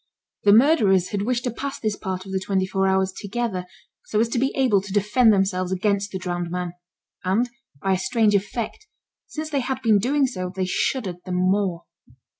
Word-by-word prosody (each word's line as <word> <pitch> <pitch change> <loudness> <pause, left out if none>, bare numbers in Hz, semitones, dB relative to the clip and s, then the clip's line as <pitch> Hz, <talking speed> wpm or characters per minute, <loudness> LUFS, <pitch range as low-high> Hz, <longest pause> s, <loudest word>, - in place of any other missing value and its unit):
The 200 - +7
murderers 210 - +5
had 205 -2 -2
wished 240 +3 0
to 245 - -1
pass 275 +4 -5
this 215 -2 -1
part 190 -2 -5
of 195 - -8
the 190 - 0
twenty 190 0 0
four 195 0 0
hours 190 0 +2
together, 205 -3 -3 0.4
so 210 - 0
as 230 +1 +2
to 240 - 0
be 270 +2 +1
able 245 -8 +3
to 200 0 -9
defend 210 +4 +4
themselves 190 -2 +1
against 200 +1 0
the 190 - -3
drowned 175 -2 -3
man, 180 0 -3 0.5
and 195 +7 +1 0.4
by 195 0 +2
a 185 - 0
strange 220 +1 +2
effect, 215 - -2 0.4
since 310 0 -6
they 285 - +1
had 260 0 -2
been 220 -3 +5
doing 275 +6 +2
so, 185 -8 -4
they 190 -1 0
shuddered 185 0 -1
the 185 - -7
more. 185 -1 +1
200 Hz, 200 wpm, -23 LUFS, 185-235 Hz, 0.5 s, The